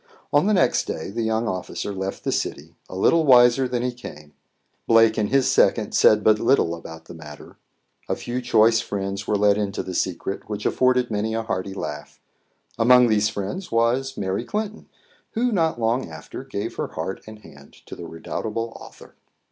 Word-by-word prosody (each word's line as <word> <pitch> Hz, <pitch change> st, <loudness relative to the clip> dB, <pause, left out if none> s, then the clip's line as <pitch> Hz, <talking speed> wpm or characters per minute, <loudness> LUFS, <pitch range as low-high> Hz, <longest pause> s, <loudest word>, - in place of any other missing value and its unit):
On 145 Hz, +7 st, +4 dB
the 215 Hz, -, +3 dB
next 180 Hz, -, +2 dB
day 80 Hz, -, -5 dB
the 115 Hz, +3 st, -3 dB
young 110 Hz, +1 st, 0 dB
officer 95 Hz, +1 st, -4 dB
left 95 Hz, 0 st, -5 dB
the -, -, -1 dB
city, -, -, -3 dB, 0.2 s
a -, -, -8 dB
little 160 Hz, -, +3 dB
wiser 125 Hz, -1 st, +5 dB
than 125 Hz, -1 st, -2 dB
he 125 Hz, -, 0 dB
came. 75 Hz, -11 st, -11 dB, 0.5 s
Blake 115 Hz, -1 st, +5 dB
and 105 Hz, -2 st, 0 dB
his 135 Hz, -1 st, +2 dB
second -, -, +2 dB
said 105 Hz, -1 st, +4 dB
but 110 Hz, -1 st, +4 dB
little 115 Hz, -9 st, +2 dB
about 80 Hz, -1 st, -10 dB
the -, -, -11 dB
matter. 75 Hz, -3 st, -12 dB, 0.5 s
A -, -, +1 dB
few 125 Hz, +1 st, -4 dB
choice 115 Hz, -1 st, +4 dB
friends 100 Hz, 0 st, -4 dB
were 105 Hz, -, +1 dB
let 105 Hz, 0 st, +3 dB
into 100 Hz, -2 st, -2 dB
the 95 Hz, -, -6 dB
secret, 95 Hz, +3 st, -3 dB
which 105 Hz, 0 st, -5 dB
afforded 125 Hz, -2 st, +2 dB
many 110 Hz, +1 st, -1 dB
a 115 Hz, -, -2 dB
hearty 95 Hz, -3 st, -4 dB
laugh. 75 Hz, -5 st, -7 dB, 0.6 s
Among 125 Hz, +1 st, +6 dB
these 110 Hz, 0 st, +2 dB
friends 110 Hz, -, -5 dB
was 125 Hz, +4 st, +1 dB
Mary 95 Hz, +3 st, -2 dB
Clinton, 215 Hz, -, -5 dB, 0.4 s
who 245 Hz, +2 st, 0 dB
not 165 Hz, -, 0 dB
long 115 Hz, -1 st, 0 dB
after 80 Hz, -1 st, -9 dB
gave -, -, -5 dB
her -, -, -2 dB
heart -, -, -5 dB
and 110 Hz, 0 st, -10 dB
hand 105 Hz, -, -16 dB
to -, -, -9 dB
the 85 Hz, -, -8 dB
redoubtable 110 Hz, +7 st, -5 dB
author. -, -, -14 dB
110 Hz, 185 wpm, -23 LUFS, 100-125 Hz, 0.6 s, Among